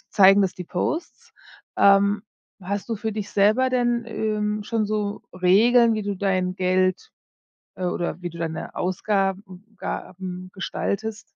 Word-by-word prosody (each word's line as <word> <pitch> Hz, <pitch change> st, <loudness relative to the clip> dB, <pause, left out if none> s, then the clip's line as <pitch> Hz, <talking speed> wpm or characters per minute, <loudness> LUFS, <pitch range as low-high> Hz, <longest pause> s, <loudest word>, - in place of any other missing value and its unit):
zeigen 195 Hz, 0 st, +7 dB
das 190 Hz, -2 st, 0 dB
die 180 Hz, -, -7 dB
Posts. 245 Hz, -, -4 dB, 0.4 s
Ähm, 200 Hz, +1 st, +4 dB, 0.4 s
hast 200 Hz, +4 st, -4 dB
du 230 Hz, -, -2 dB
für 220 Hz, +1 st, -3 dB
dich 210 Hz, -1 st, -5 dB
selber 215 Hz, +6 st, +3 dB
denn, 240 Hz, -2 st, +1 dB
ähm, 210 Hz, -1 st, -2 dB
schon 220 Hz, 0 st, -1 dB
so 210 Hz, -1 st, -2 dB
Regeln, 225 Hz, +6 st, +5 dB
wie 215 Hz, -1 st, -2 dB
du 200 Hz, -1 st, -2 dB
dein 185 Hz, -1 st, 0 dB
Geld, 185 Hz, 0 st, +1 dB, 0.7 s
äh 185 Hz, -, -4 dB
oder 175 Hz, -1 st, -2 dB
wie 175 Hz, -, -2 dB
du 170 Hz, -, -11 dB
deine 160 Hz, -1 st, -4 dB
Ausgaben 195 Hz, 0 st, -2 dB
Gaben 185 Hz, 0 st, -6 dB
gestaltest? 215 Hz, +3 st, -3 dB
200 Hz, 145 wpm, -24 LUFS, 185-215 Hz, 0.7 s, zeigen